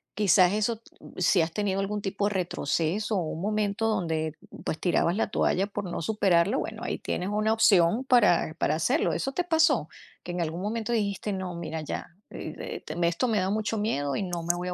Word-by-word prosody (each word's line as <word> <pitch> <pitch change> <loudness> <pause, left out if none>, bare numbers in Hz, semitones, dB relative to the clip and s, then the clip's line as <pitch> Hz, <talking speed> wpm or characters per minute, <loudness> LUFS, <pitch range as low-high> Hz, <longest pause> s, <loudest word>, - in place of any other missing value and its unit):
quizás 190 -2 +5
eso, 215 +1 0 0.2
mm, - - -14
si 180 0 +4
has 160 +1 -1
tenido 200 -2 0
algún 205 +1 -1
tipo 200 +1 -1
de 210 - -2
retroceso 180 +4 -1
o - - +2
un 160 +1 -5
momento 210 +1 0
donde, 160 -6 -1 0.3
pues, 155 - -2
tirabas 175 0 +2
la 225 - +1
toalla 195 +2 +2
por 205 -1 -5
no 175 - -4
superarlo, 195 - +2
bueno, 220 +1 -5
ahí - - -3
tienes 180 +2 -3
una 215 +1 +1
opción 215 +1 +4
para 210 -11 +4
para - - +2
hacerlo, 250 - +1
¿eso 270 - -2
te 355 - -1
pasó? 320 - +3 0.3
Que 175 - -5
en 175 - -2
algún 165 +2 -3
momento 225 +3 -2
dijiste: 205 -1 -1
"No, 185 -2 -4
mira 160 -2 -4
ya, 155 - -5 0.2
eh, 155 - -7
eh, - - -6
te 155 - -6
esto 170 +9 0
me 220 -3 +1
da 185 +1 0
mucho 215 +1 -1
miedo 145 -10 -1
y - - -1
no 175 -2 -4
me 170 - +1
voy 180 +1 -4
a - - -2
195 Hz, 215 wpm, -27 LUFS, 170-215 Hz, 0.3 s, quizás